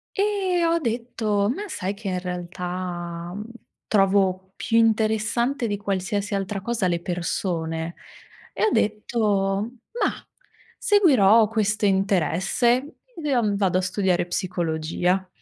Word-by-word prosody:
E 390 Hz, -4 st, +1 dB
ho 335 Hz, 0 st, +2 dB
detto: 225 Hz, -5 st, -1 dB
"Ma 415 Hz, +5 st, -6 dB
sai 195 Hz, -, -3 dB
che 205 Hz, 0 st, -8 dB
in 185 Hz, -, -1 dB
realtà 175 Hz, -1 st, -5 dB, 0.5 s
trovo 190 Hz, -2 st, +2 dB
più 230 Hz, -, 0 dB
interessante 225 Hz, +3 st, +2 dB
di 205 Hz, -1 st, -1 dB
qualsiasi 200 Hz, +1 st, -2 dB
altra 195 Hz, 0 st, -3 dB
cosa 230 Hz, -2 st, 0 dB
le 170 Hz, -1 st, 0 dB
persone?" 170 Hz, -2 st, -2 dB, 0.6 s
E -, -, +1 dB
ho 430 Hz, -, +2 dB
detto: 210 Hz, -1 st, 0 dB, 0.3 s
"Mah, -, -, -2 dB, 0.5 s
seguirò 235 Hz, -, +5 dB
questo 215 Hz, -1 st, 0 dB
interesse. 195 Hz, -, +1 dB, 0.3 s
Io, 265 Hz, -6 st, +2 dB
mhmm, 205 Hz, -1 st, +1 dB
vado 190 Hz, -3 st, +2 dB
a 185 Hz, -, +2 dB
studiare 185 Hz, -1 st, +1 dB
psicologia." 175 Hz, +1 st, -1 dB
200 Hz, 115 wpm, -24 LUFS, 180-230 Hz, 0.6 s, seguirò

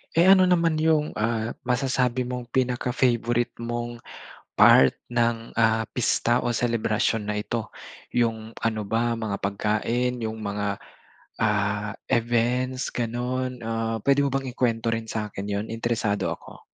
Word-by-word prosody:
Eh, 170 Hz, +3 st, +5 dB
ano 190 Hz, -1 st, +8 dB
naman 170 Hz, -3 st, +3 dB
'yung 155 Hz, -1 st, +1 dB
ah, 115 Hz, +1 st, -1 dB
masasabi 125 Hz, 0 st, 0 dB
mong 125 Hz, -1 st, -6 dB
pinaka-favorite 120 Hz, -1 st, +1 dB
mong 120 Hz, 0 st, -4 dB, 0.6 s
part 65 Hz, -, +8 dB, 0.2 s
ng 115 Hz, -1 st, -1 dB
ah, 110 Hz, -1 st, +2 dB
pista 120 Hz, 0 st, +1 dB
o 120 Hz, -, 0 dB
selebrasyon 115 Hz, -2 st, 0 dB
na 105 Hz, -, -1 dB
ito, 110 Hz, +1 st, -3 dB, 0.4 s
'yung 110 Hz, -2 st, 0 dB
ano 110 Hz, -1 st, -1 dB
ba 115 Hz, +3 st, 0 dB
mga 110 Hz, -3 st, -3 dB
pagkain, 110 Hz, +5 st, -1 dB
'yung 110 Hz, -1 st, -4 dB
mga 100 Hz, -1 st, -3 dB, 0.6 s
ah, 105 Hz, -1 st, 0 dB, 0.2 s
events, 125 Hz, +2 st, +1 dB
gano'n? 125 Hz, +1 st, -3 dB
Ah, 115 Hz, 0 st, -2 dB
puwede 140 Hz, 0 st, +3 dB
mo -, -, +1 dB
bang 135 Hz, -1 st, -1 dB
ikwento 115 Hz, -2 st, 0 dB
rin 115 Hz, 0 st, -2 dB
sa'kin 105 Hz, -3 st, -4 dB
'yun? 100 Hz, +1 st, -2 dB
Interesado 115 Hz, -3 st, -1 dB
ako. -, -, -15 dB
115 Hz, 130 wpm, -25 LUFS, 110-125 Hz, 0.6 s, ano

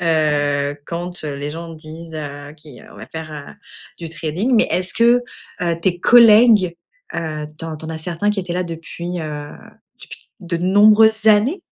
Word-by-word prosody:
heu, 145 Hz, -3 st, 0 dB
quand 175 Hz, 0 st, -4 dB
heu, 145 Hz, -2 st, -4 dB
les 145 Hz, +1 st, -5 dB
gens 165 Hz, +1 st, -8 dB
disent: 160 Hz, +1 st, -11 dB
«Heu, 145 Hz, -1 st, -7 dB
qui 150 Hz, -4 st, -14 dB
heu, -, -, -16 dB
on -, -, -16 dB
va -, -, -10 dB
faire, 160 Hz, -1 st, -8 dB
heu, 145 Hz, -1 st, -9 dB, 0.5 s
du 165 Hz, -2 st, -6 dB
trading», 165 Hz, +9 st, -3 dB
mais -, -, +4 dB
est-ce 185 Hz, +1 st, 0 dB
que 235 Hz, +1 st, +4 dB, 0.4 s
heu, 170 Hz, -1 st, 0 dB
tes 175 Hz, -1 st, 0 dB
collègues, 220 Hz, -6 st, +6 dB, 0.4 s
heu, 155 Hz, -2 st, -4 dB
tu -, -, -6 dB
en 160 Hz, -1 st, -5 dB
tu 155 Hz, -, -8 dB
en -, -, -6 dB
as 160 Hz, -, -5 dB
certains 175 Hz, +5 st, -2 dB
qui 205 Hz, -2 st, -2 dB
étaient 180 Hz, -1 st, -6 dB
là 180 Hz, 0 st, -1 dB
depuis, 170 Hz, +1 st, -6 dB
heu, 150 Hz, -1 st, -6 dB, 0.5 s
depuis -, -, -13 dB
de 175 Hz, -1 st, -3 dB
nombreuses 215 Hz, +4 st, +4 dB
années? 225 Hz, -, +3 dB
170 Hz, 190 wpm, -19 LUFS, 155-195 Hz, 0.5 s, collègues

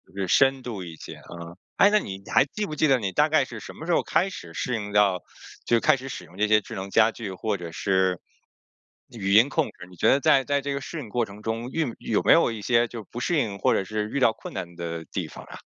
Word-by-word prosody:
就 100 Hz, -, -3 dB
是 95 Hz, -, -1 dB
深 135 Hz, +6 st, +4 dB
度 105 Hz, -7 st, -5 dB
一 85 Hz, -2 st, -8 dB
些， -, -, -10 dB, 0.2 s
嗯， 85 Hz, 0 st, -9 dB, 0.2 s
诶， 200 Hz, -, +7 dB
那 210 Hz, 0 st, +4 dB
你 95 Hz, -, -7 dB
还 135 Hz, -, +6 dB
记 210 Hz, +8 st, -4 dB
不 155 Hz, -, -6 dB
记 155 Hz, -, +2 dB
得 135 Hz, -2 st, +4 dB
你 100 Hz, -3 st, -2 dB
大 150 Hz, +6 st, +3 dB
概 155 Hz, -3 st, +4 dB
是 115 Hz, -3 st, -8 dB
什 -, -, -10 dB
么 160 Hz, -, -9 dB
时 175 Hz, -, -1 dB
候 -, -, +2 dB
开 195 Hz, -, +1 dB
始 85 Hz, -, -9 dB
适 125 Hz, +7 st, -2 dB
应 105 Hz, -1 st, -5 dB
到 100 Hz, -3 st, +3 dB, 0.4 s
就 120 Hz, -1 st, +3 dB
开 135 Hz, -, +4 dB
始 130 Hz, +1 st, -8 dB
使 90 Hz, -, -7 dB
用 90 Hz, -, -17 dB
这 105 Hz, +1 st, +2 dB
些 110 Hz, 0 st, +4 dB
智 -, -, -9 dB
能 95 Hz, +1 st, -5 dB
家 110 Hz, +2 st, +4 dB
具 105 Hz, -5 st, -6 dB
或 105 Hz, +2 st, -2 dB
者 85 Hz, -2 st, -7 dB
是 95 Hz, 0 st, +1 dB, 0.9 s
语 100 Hz, -4 st, -2 dB
音 115 Hz, +6 st, +6 dB
控 160 Hz, 0 st, +1 dB
制， 90 Hz, -, -12 dB
你 90 Hz, -, -15 dB
觉 -, -, +3 dB
得 135 Hz, -, +4 dB
在 135 Hz, 0 st, +4 dB
在 140 Hz, 0 st, 0 dB
这 140 Hz, 0 st, -3 dB
个 140 Hz, -, -3 dB
适 165 Hz, -, -6 dB
应 115 Hz, -, -9 dB
过 120 Hz, +1 st, 0 dB
程 100 Hz, +1 st, -12 dB
中， 115 Hz, +3 st, -3 dB
运 155 Hz, -8 st, -1 dB
有 -, -, 0 dB
没 -, -, +4 dB
有 -, -, +6 dB
过 -, -, +1 dB
一 110 Hz, -2 st, -6 dB
些 120 Hz, +2 st, +2 dB
就 115 Hz, -2 st, -8 dB
不 120 Hz, -, -5 dB
适 165 Hz, +6 st, 0 dB
应 105 Hz, -7 st, -1 dB
或 -, -, +3 dB
者 95 Hz, -, +1 dB
是 105 Hz, +2 st, -3 dB
遇 140 Hz, -, -2 dB
到 115 Hz, -3 st, +5 dB
困 -, -, -10 dB
难 85 Hz, -2 st, -6 dB
的 85 Hz, -1 st, -5 dB
地 -, -, -4 dB
方 -, -, -11 dB
啊？ -, -, -11 dB
110 Hz, 305 characters per minute, -25 LUFS, 95-135 Hz, 0.9 s, 诶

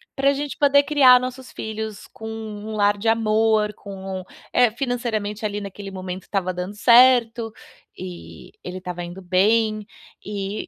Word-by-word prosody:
pra 275 Hz, 0 st, +3 dB
gente 285 Hz, 0 st, -4 dB
poder 285 Hz, 0 st, +5 dB
criar 275 Hz, -4 st, +6 dB
nossos 255 Hz, +1 st, -6 dB
filhos 220 Hz, -1 st, -6 dB
com 220 Hz, -, -9 dB
um 220 Hz, -1 st, -6 dB
lar 205 Hz, 0 st, +2 dB
de 210 Hz, +3 st, -4 dB
amor, 220 Hz, -1 st, +2 dB
com 190 Hz, -1 st, -7 dB, 0.3 s
é, 245 Hz, -3 st, +4 dB
financeiramente, 225 Hz, -4 st, -3 dB
ali, 205 Hz, 0 st, -2 dB
naquele 200 Hz, 0 st, -8 dB
momento 185 Hz, 0 st, -6 dB
estava 190 Hz, -2 st, -2 dB
dando 180 Hz, +3 st, -5 dB
certo, 235 Hz, 0 st, +5 dB, 0.5 s
eh, 85 Hz, -2 st, -9 dB
ele 180 Hz, +1 st, -6 dB
estava 180 Hz, -1 st, -6 dB
indo 175 Hz, +2 st, -8 dB
bem. 215 Hz, +4 st, +2 dB, 0.4 s
Eh 200 Hz, 0 st, -4 dB
215 Hz, 145 wpm, -22 LUFS, 195-235 Hz, 0.5 s, criar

